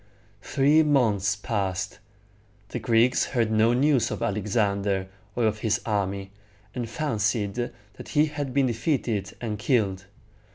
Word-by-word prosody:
Three 145 +6 +3
months 110 -10 +2
passed. 100 -2 -3 0.7
The - - -4
Greeks 120 +2 +3
heard 115 -4 0
no 110 +1 +4
news 130 -2 +3
of - - -4
Alexander 100 -2 0 0.3
or 120 - +1
of 110 0 0
his 110 0 +1
army, 100 -2 -2 0.4
and 120 -3 -4
fancied 110 -5 -1
that 105 -3 -7
he 150 0 +3
had 145 -3 -4
been 135 +1 +2
defeated 115 -5 -1
and 105 -4 -3
killed. 105 -7 +1
110 Hz, 130 wpm, -26 LUFS, 100-125 Hz, 0.7 s, no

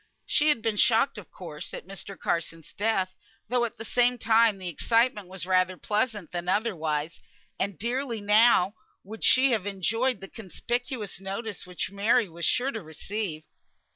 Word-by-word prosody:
She 300 +1 +3
had 240 -7 +2
been 225 -2 0
shocked, 225 +2 +3
of 195 - -13
course, 155 -5 -8
at - - -8
Mr. 195 0 -8
Carson's 165 -1 -3
death, 195 -3 0 0.4
though 245 0 +2
at 230 - -7
the 225 - -7
same 245 +2 +3
time 225 -2 +4
the 185 -1 -6
excitement 225 - +1
was 185 -2 -6
rather 185 0 +2
pleasant 210 -4 -1
than 175 0 -3
otherwise; 170 -7 -1 0.4
and 200 -1 -2
dearly 240 +1 -1
now 210 -2 +5 0.3
would 215 +3 -9
she 260 +1 +6
have 210 -4 0
enjoyed 225 +6 0
the 195 - -8
conspicuous 230 +1 -4
notice 195 +1 -5
which 180 0 -4
Mary 210 +3 +2
was 170 0 -5
sure 260 +3 +2
to 225 - -5
receive. 160 +1 -5
205 Hz, 165 wpm, -27 LUFS, 185-230 Hz, 0.4 s, she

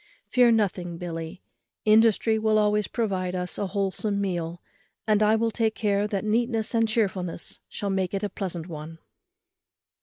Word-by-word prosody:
Fear 245 -2 +4
nothing, 180 -5 0
Billy, 165 +1 -6 0.4
industry 220 0 +4
will 215 0 +2
always 210 -1 +2
provide 185 -6 -1
us 180 -3 -3
a 200 - -1
wholesome 200 +1 -1
meal; 175 -3 -2 0.5
and 215 -1 +3
I 215 +1 +5
will 225 +1 +1
take 220 -1 0
care 205 -1 +1
that 200 -1 -2
neatness 225 +1 +1
and 225 -1 +2
chearfulness 190 -7 -2
shall 200 -1 -3
make 190 0 -1
it 195 - -2
a 205 - 0
pleasant 180 -5 -5
one." 160 -1 -8
200 Hz, 155 wpm, -26 LUFS, 180-220 Hz, 0.5 s, I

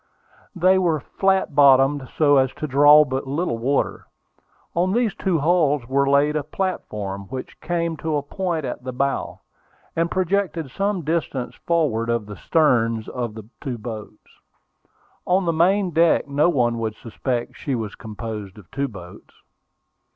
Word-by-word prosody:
They 185 +2 +4
were 170 -4 +1
flat 190 +1 0
bottomed, 135 -1 +4
so 145 -2 +5
as 130 -1 +3
to - - -5
draw 145 +2 +7
but 135 0 -3
little 140 -4 -2
water. 135 +4 -1 0.7
On 180 +3 +1
these 235 -2 +1
two 190 -4 0
hulls 150 -5 +2
were 140 +1 +2
laid 145 +2 +3
a 155 - +1
platform, 105 - -4
which 130 -1 -7
came 170 -1 -1
to 160 +1 -2
a 145 - -1
point 170 -1 -3
at 125 0 -5
the 130 0 -5
bow, 140 +2 -2 0.5
and 165 +1 +1
projected 180 -5 -1
some 195 +1 -1
distance 150 -5 -2
forward 145 -10 +1
of 115 -2 0
the 105 0 -8
stems 115 -8 +1
of 120 -4 -4
the 110 -2 -10 0.2
two 125 -3 -3
boats. 110 -1 -9 0.9
On 185 +1 +2
the 170 - +1
main 185 +3 +2
deck, 165 -1 +3
no 145 +4 +2
one 120 -7 +1
would 110 -1 -3
suspect 120 +2 -3
that - - -19
she 140 - -2
was 110 -4 -4
composed 110 -2 -7
of 100 -5 -16
two 140 +1 -1
boats. 90 -7 -12
140 Hz, 160 wpm, -22 LUFS, 120-170 Hz, 0.9 s, draw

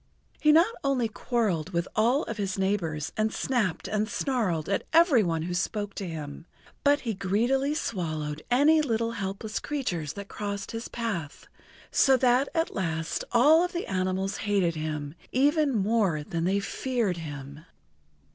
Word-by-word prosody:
He 305 - +5
not 340 +9 +5
only 265 -4 +1
quarreled 205 -7 -1
with 170 +1 0
all 240 +7 +3
of 230 - -5
his 195 -2 -2
neighbors 170 -6 -1
and 215 0 +1
snapped 225 -10 -1
and 215 +1 -1
snarled 225 - -1
at 200 - 0
every 325 -7 +6
one 165 -4 0
who 175 +1 -3
spoke 205 +3 -2
to 195 - -5
him, 155 0 -7 0.4
but 285 +1 +4
he 230 -3 -2
greedily 240 +9 +1
swallowed 155 - -3
any 295 +6 +5
little 230 -5 0
helpless 205 0 -4
creatures 180 - -3
that 200 0 -7
crossed 200 -1 -5
his 225 0 -5
path, 185 -11 -4 0.5
so 265 -1 +5
that 250 +2 +3
at 325 0 0
last 165 -4 -2
all 295 +8 +6
of 360 +1 -3
the 345 - -2
animals 190 +1 -1
hated 200 -5 +1
him 155 -2 -4 0.2
even 290 +3 +3
more 200 -7 +1
than 165 +2 -3
they 195 +2 +2
feared 220 -2 -1
him. 145 -2 -8
205 Hz, 155 wpm, -27 LUFS, 170-250 Hz, 0.5 s, every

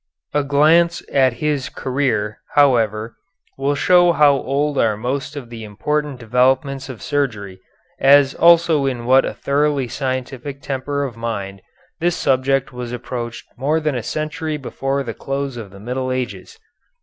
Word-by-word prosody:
A 145 - +2
glance 160 +5 +3
at 130 -3 +4
his 145 -3 0
career, 125 -6 -1 0.2
however, 115 -6 +2 0.4
will 140 +1 0
show 175 +2 +4
how 150 -3 +5
old 140 +2 -1
are 110 -2 +2
most 130 +6 -3
of 125 -5 -8
the 115 -1 -7
important 145 +6 -2
developments 130 +3 +1
of 125 -4 -8
surgery, 105 -10 -2 0.4
as 140 0 +5
also 165 -4 +4
in 120 -3 -3
what 130 +2 +5
a - - -3
thoroughly 140 -1 0
scientific 130 +1 -4
temper 140 +1 -3
of 130 -5 -5
mind 100 -4 -4 0.4
this 175 +1 +1
subject 135 -1 +1
was 125 -1 -6
approached 120 -1 -5
more 150 +4 +1
than 155 -2 -1
a 125 - -2
century 155 +5 -3
before 135 0 -3
the 115 -3 -5
close 135 +1 -4
of 115 -4 -7
the 100 +1 -14
Middle 130 +4 -3
Ages. 130 - -4
135 Hz, 150 wpm, -20 LUFS, 120-145 Hz, 0.4 s, how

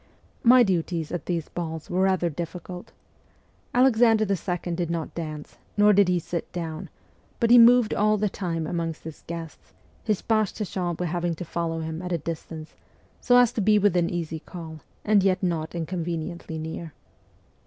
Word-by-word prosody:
My 245 +1 +7
duties 170 -5 -1
at 175 - -4
these 170 -3 -2
balls 160 -2 -5
were 180 +1 0
rather 190 -2 +2
difficult. 175 +3 -7 0.8
Alexander 235 -3 +4
II. 180 -2 -2
did 170 -1 -2
not 165 -2 -3
dance, 155 -3 -7 0.2
nor 210 0 +6
did 200 -1 +5
he 180 0 +2
sit 170 0 -4
down, 170 0 -5 0.5
but 230 0 +2
he 245 - +9
moved 240 -1 +6
all 215 +1 +2
the 210 +1 +1
time 170 -5 -3
amongst 165 0 -3
his 160 -1 -9
guests, 165 -2 -8 0.3
his 215 -4 -1
page 215 -3 +1
de 210 - -3
chambre 180 -2 -3
having 175 0 -1
to 175 - -6
follow 165 0 -2
him 160 +1 -5
at 180 0 -5
a 170 - +1
distance, 160 0 -7 0.5
so 245 -1 +4
as 245 -1 +5
to 225 - -1
be 210 +1 +4
within 180 -4 +2
easy 165 -2 -3
call, 160 -2 -9 0.3
and 210 -1 +4
yet 190 0 +1
not 165 -2 -1
inconveniently 170 -1 -4
near. 160 0 -6
175 Hz, 170 wpm, -25 LUFS, 165-200 Hz, 0.8 s, he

